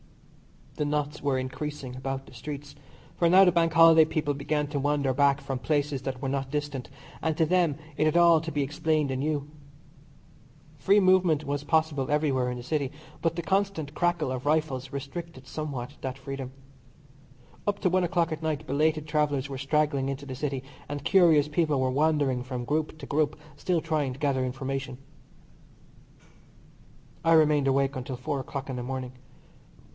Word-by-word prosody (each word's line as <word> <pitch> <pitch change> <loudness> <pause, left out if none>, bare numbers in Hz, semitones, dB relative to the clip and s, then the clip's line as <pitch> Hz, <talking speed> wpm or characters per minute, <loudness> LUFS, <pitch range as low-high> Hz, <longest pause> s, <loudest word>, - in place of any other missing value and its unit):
The 150 - 0
knots 150 0 -2
were 140 -2 +1
increasing 130 0 -5
about 135 +1 -4
the - - -16
streets, 145 -1 -7 0.4
for 170 - +3
now 190 +2 +8
the 180 - +5
Bank 165 -1 +2
Holiday 165 -1 +8
people 155 -2 -1
began 150 +1 -1
to 145 -1 -2
wander 140 -1 +1
back 140 +1 +3
from 135 -2 -4
places 145 -2 0
that 135 0 -4
were 135 - -1
not 135 0 -2
distant, 145 -3 -3 0.3
and 160 -1 -1
to 160 - +3
them 175 -3 +2 0.2
it 155 - +2
had 155 +2 +3
all 170 -2 +6
to 165 0 -5
be 145 -2 0
explained 150 0 0
anew. 145 +2 -1 1.3
Free 200 +2 +4
movement 185 -5 +4
was 145 0 -3
possible 150 -3 +1
everywhere 140 -4 +1
in 125 - -4
the 120 - -7
City, 140 -1 -1 0.3
but 165 0 0
the 170 - -3
constant 190 -6 -1
crackle 170 -4 0
of 130 +2 -4
rifles 140 -4 0
restricted 140 0 -7
somewhat 140 -4 -5
that 130 0 -4
freedom. 135 -1 -6 1.2
Up 205 -1 +1
to 185 - +3
one 185 +1 +2
o'clock 170 -1 +1
at 155 0 -4
night 155 -1 -2
belated 155 +2 +1
travellers 150 -3 0
were 135 -1 -5
straggling 140 -1 +1
into 140 +1 -5
the 130 - -6
City, 135 0 -3 0.3
and 145 -1 -4
curious 160 -4 +5
people 150 -2 +1
were 130 0 +1
wandering 145 -3 +2
from 125 -1 -5
group 155 +3 -1
to - - -9
group 150 0 0 0.2
still 170 +3 0
trying 150 -5 -1
to 130 - -12
gather 140 -3 +1
information. 135 0 -4 2.3
I 165 0 +4
remained 150 -3 +4
awake 135 +1 +2
until 130 0 -5
four 135 +3 -3
o'clock 135 +1 -5
in 130 -2 -4
the - - -3
morning. 130 0 -4
145 Hz, 175 wpm, -27 LUFS, 135-155 Hz, 2.3 s, now